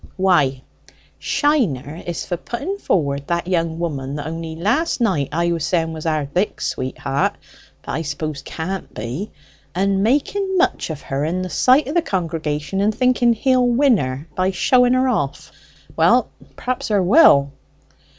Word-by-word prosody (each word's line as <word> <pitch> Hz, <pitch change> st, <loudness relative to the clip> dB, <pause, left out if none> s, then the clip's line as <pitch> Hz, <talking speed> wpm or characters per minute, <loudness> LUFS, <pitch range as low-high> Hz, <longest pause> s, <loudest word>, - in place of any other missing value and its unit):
Why, 145 Hz, -9 st, +2 dB, 0.6 s
Shiner 175 Hz, -, 0 dB
is 175 Hz, -, -3 dB
for 180 Hz, -, -2 dB
putting 280 Hz, -, -5 dB
forward 140 Hz, -, -1 dB
that 170 Hz, 0 st, -1 dB
young 165 Hz, -3 st, 0 dB
woman 145 Hz, -5 st, -3 dB
that 145 Hz, -, -5 dB
only 160 Hz, 0 st, -5 dB
last 230 Hz, -, 0 dB
night 185 Hz, -, +1 dB
I 170 Hz, +2 st, 0 dB
was 165 Hz, -2 st, -2 dB
saying 165 Hz, -1 st, 0 dB
was 160 Hz, +1 st, -5 dB
our 155 Hz, -2 st, 0 dB
Dick's 180 Hz, +9 st, -2 dB
sweet 130 Hz, -, -4 dB
heart, 140 Hz, 0 st, 0 dB, 0.5 s
but -, -, -6 dB
I 160 Hz, -, -2 dB
suppose 150 Hz, -1 st, -4 dB
can't 185 Hz, +3 st, -5 dB
be, 125 Hz, -, -5 dB, 0.5 s
and 195 Hz, +1 st, +1 dB
making 370 Hz, -, +1 dB
much 360 Hz, -, +1 dB
of 155 Hz, -3 st, -6 dB
her 135 Hz, +1 st, -2 dB
in 175 Hz, +4 st, -1 dB
the 185 Hz, -, -5 dB
sight 260 Hz, +2 st, +4 dB
of 285 Hz, -, -3 dB
the 345 Hz, -, +3 dB
congregation, 165 Hz, -, -2 dB
and 210 Hz, +1 st, +1 dB
thinking 250 Hz, -2 st, +3 dB
he'll 255 Hz, +2 st, +2 dB
win 245 Hz, 0 st, +4 dB
her 130 Hz, +1 st, -4 dB
by 185 Hz, +3 st, +1 dB
showing 245 Hz, +6 st, +3 dB
her 255 Hz, +1 st, +2 dB
off. 145 Hz, -, -2 dB, 0.4 s
Well, -, -, +3 dB, 0.2 s
perhaps 255 Hz, -2 st, -3 dB
'a 210 Hz, -2 st, +3 dB
woll." 175 Hz, -, +6 dB
175 Hz, 165 wpm, -20 LUFS, 150-240 Hz, 0.6 s, woll